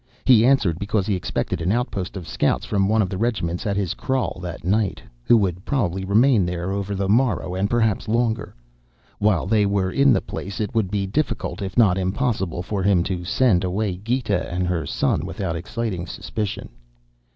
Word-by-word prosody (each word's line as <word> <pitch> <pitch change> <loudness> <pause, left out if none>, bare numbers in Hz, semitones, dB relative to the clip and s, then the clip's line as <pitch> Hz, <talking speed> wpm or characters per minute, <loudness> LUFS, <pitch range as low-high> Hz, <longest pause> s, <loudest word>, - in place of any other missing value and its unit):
He 115 -4 +6
answered 120 -10 +3
because 100 -1 0
he 105 - 0
expected 90 -2 -2
an 85 +3 +1
outpost 105 -5 -2
of 90 - -8
scouts - - 0
from 100 -1 +1
one 110 0 +3
of 95 - -3
the 95 - -3
regiments 105 -6 -1
at 100 -1 0
his 95 -3 -1
kraal 130 -8 -2
that 90 -1 -6
night, 100 +2 +1 0.3
who 120 - +6
would 95 -3 -1
probably 95 -10 -1
remain 110 +3 +4
there 90 +1 -2
over 100 0 -2
the 95 0 -1
morrow 110 -4 +1
and 95 +2 0
perhaps 115 -2 +1
longer. 115 0 0 0.6
While 100 -6 +2
they 105 +1 +2
were 100 -2 0
in 140 +3 +4
the 100 - +4
place 95 0 -6
it 110 +3 -2
would 110 -5 +1
be 100 -1 -1
difficult, 115 +1 -2
if 95 -2 -5
not 95 -6 +5
impossible, 95 -3 -1
for 100 +1 -3
him 95 -2 +3
to 90 -1 -3
send 95 0 +2
away 95 +1 -1
Gita 105 -2 -1
and 90 +1 -1
her 90 -2 -1
son - - 0
without 85 -4 -3
exciting 95 0 -4
suspicion. 105 +4 -4
100 Hz, 190 wpm, -22 LUFS, 90-110 Hz, 0.6 s, He